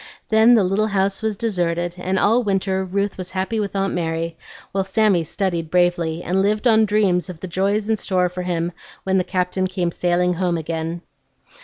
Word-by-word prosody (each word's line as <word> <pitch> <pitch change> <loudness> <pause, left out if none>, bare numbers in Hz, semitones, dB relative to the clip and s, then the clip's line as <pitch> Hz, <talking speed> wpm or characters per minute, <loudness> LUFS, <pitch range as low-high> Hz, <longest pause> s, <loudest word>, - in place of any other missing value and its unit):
Then 220 +2 +6
the 215 - +4
little 195 +4 +1
house 195 -1 0
was 220 -1 -1
deserted, 175 -5 -1
and 185 +1 -2
all 225 +6 +3
winter 195 -3 0
Ruth 200 +1 -2
was 185 0 -5
happy 190 +4 -2
with 200 -1 -3
Aunt 195 0 0
Mary, 165 -1 -2 0.4
while 195 0 0
Sammy 195 -2 +2
studied 170 -1 -2
bravely, 175 -1 +1
and 185 +2 +1
lived 210 +4 +1
on 220 -1 +5
dreams 200 -3 +1
of 175 -3 -8
the 185 - -6
joys 200 +4 0
in 220 - +2
store 185 -3 +1
for 180 +1 -5
him 175 -1 -2 0.3
when 190 0 +2
the - - +1
Captain 185 0 -1
came 180 -2 -2
sailing 180 +1 +1
home 175 -1 0
again. 165 +1 -4
185 Hz, 190 wpm, -21 LUFS, 175-200 Hz, 0.4 s, Then